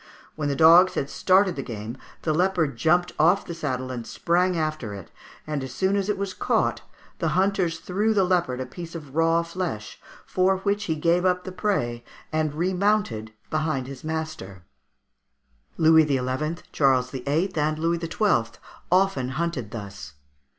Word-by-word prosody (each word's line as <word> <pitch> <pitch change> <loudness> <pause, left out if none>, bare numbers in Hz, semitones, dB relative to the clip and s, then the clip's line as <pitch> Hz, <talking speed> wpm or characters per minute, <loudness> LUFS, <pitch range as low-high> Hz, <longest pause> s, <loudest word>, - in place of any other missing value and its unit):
When 150 -2 -2
the 140 - 0
dogs 170 +5 +7
had 140 - -2
started 185 -1 +3
the 140 - -3
game 115 -1 -6 0.3
the 155 - +1
leopard 170 -4 +1
jumped 175 +9 +2
off 175 +6 +4
the 170 - -5
saddle 130 -6 -3
and 120 -2 -6
sprang 180 +1 +1
after 155 -9 -2
it, 95 -4 -11 0.3
and 150 -3 -3
as 130 -2 -7
soon 190 +1 +1
as 200 0 -1
it 210 - 0
was 195 -1 -3
caught - - 0 0.4
the - - 0
hunters 190 -3 +1
threw 210 +4 0
the 195 - +4
leopard 175 -8 +1
a - - -3
piece 170 +6 -9
of 150 -5 -9
raw 165 +1 +3
flesh, 170 - -5 0.2
for 190 +1 +2
which 205 +1 0
he 160 - -1
gave 170 +3 +2
up 180 -1 +1
the 185 - -6
prey 180 - -1 0.3
and 155 -1 -1
remounted 180 - 0 0.2
behind 155 -4 -1
his 135 0 -9
master 155 - -5 1.1
(Fig. 160 - 0
142) 150 -5 +4
Louis 130 +5 -1
XI., - - -17
Charles 130 -3 +2
VIII., 145 +8 -1
and 155 0 0
Louis 165 +2 0
XII. 165 - 0 0.3
often 180 -9 +2
hunted 165 -10 -2
thus. 100 - -8
160 Hz, 170 wpm, -25 LUFS, 130-180 Hz, 1.1 s, dogs